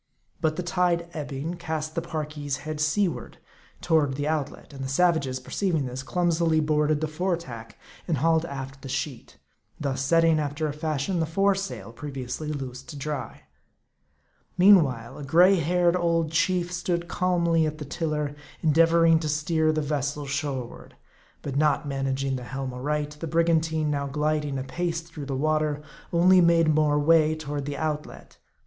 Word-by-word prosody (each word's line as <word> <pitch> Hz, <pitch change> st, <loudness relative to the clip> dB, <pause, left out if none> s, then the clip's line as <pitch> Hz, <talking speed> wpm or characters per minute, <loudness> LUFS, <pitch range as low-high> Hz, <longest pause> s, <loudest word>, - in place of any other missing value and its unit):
But 155 Hz, -1 st, +1 dB
the 180 Hz, -, -3 dB
tide 175 Hz, -1 st, +1 dB
ebbing, 150 Hz, +2 st, -4 dB
cast 160 Hz, -2 st, -4 dB
the 165 Hz, -, -1 dB
Parki's 150 Hz, -4 st, -4 dB
head 155 Hz, -1 st, -3 dB
seaward 170 Hz, +4 st, 0 dB, 0.4 s
toward 155 Hz, -5 st, +2 dB
the 145 Hz, +2 st, -2 dB
out 150 Hz, -3 st, 0 dB
let; -, -, -15 dB
and 135 Hz, -1 st, -6 dB
the -, -, -3 dB
savages, 140 Hz, -4 st, +2 dB
perceiving 160 Hz, +2 st, -1 dB
this, 125 Hz, +1 st, -5 dB
clumsily 165 Hz, +1 st, +1 dB
boarded 150 Hz, 0 st, +1 dB
the 155 Hz, -, 0 dB
fore 175 Hz, +3 st, -1 dB
tack, 115 Hz, -8 st, -10 dB, 0.3 s
and 165 Hz, -4 st, +1 dB
hauled 160 Hz, +3 st, +3 dB
aft 135 Hz, -3 st, -7 dB
the 135 Hz, -, -8 dB
sheet; 130 Hz, 0 st, -4 dB, 0.4 s
thus 140 Hz, -3 st, -2 dB
setting, 165 Hz, +2 st, +4 dB
after 150 Hz, +1 st, -2 dB
a 145 Hz, -, -3 dB
fashion, 155 Hz, +3 st, -2 dB
the 160 Hz, -, 0 dB
fore 195 Hz, +5 st, +3 dB
sail, 190 Hz, -, -5 dB
previously 135 Hz, +1 st, -5 dB
loosed 130 Hz, -3 st, -6 dB
to -, -, -7 dB
dry. 140 Hz, -, -5 dB, 1.1 s
Meanwhile, 145 Hz, -, +4 dB
a -, -, -6 dB
gray 180 Hz, +7 st, +5 dB
headed 175 Hz, +2 st, +2 dB
old 165 Hz, -3 st, +1 dB
chief 175 Hz, +1 st, +1 dB
stood 175 Hz, -1 st, -2 dB
calmly 170 Hz, -3 st, +2 dB
at 155 Hz, 0 st, -4 dB
the 150 Hz, -, -6 dB
tiller, 150 Hz, -1 st, -2 dB, 0.3 s
endeavoring 165 Hz, +1 st, +5 dB
to 155 Hz, -1 st, -3 dB
steer 155 Hz, +1 st, +1 dB
the 155 Hz, -1 st, -1 dB
vessel 145 Hz, 0 st, -2 dB
shoreward. 135 Hz, -3 st, -4 dB, 0.5 s
But 140 Hz, -1 st, -3 dB
not 150 Hz, 0 st, +2 dB
managing 135 Hz, -1 st, -1 dB
the 125 Hz, -, -7 dB
helm 135 Hz, 0 st, -5 dB
aright, 145 Hz, +3 st, -2 dB
the 165 Hz, -, -4 dB
brigantine, 160 Hz, -1 st, +1 dB
now 140 Hz, -1 st, -1 dB
gliding 150 Hz, 0 st, -1 dB
apace 165 Hz, +6 st, -2 dB
through 160 Hz, -4 st, -9 dB
the 135 Hz, -, -2 dB
water, 155 Hz, 0 st, +1 dB, 0.3 s
only 180 Hz, +2 st, +6 dB
made 165 Hz, -2 st, +4 dB
more 150 Hz, -1 st, +3 dB
way 155 Hz, +1 st, +4 dB
toward 145 Hz, -2 st, -4 dB
the 145 Hz, -1 st, -4 dB
outlet. 150 Hz, -1 st, -4 dB
155 Hz, 165 wpm, -26 LUFS, 140-165 Hz, 1.1 s, only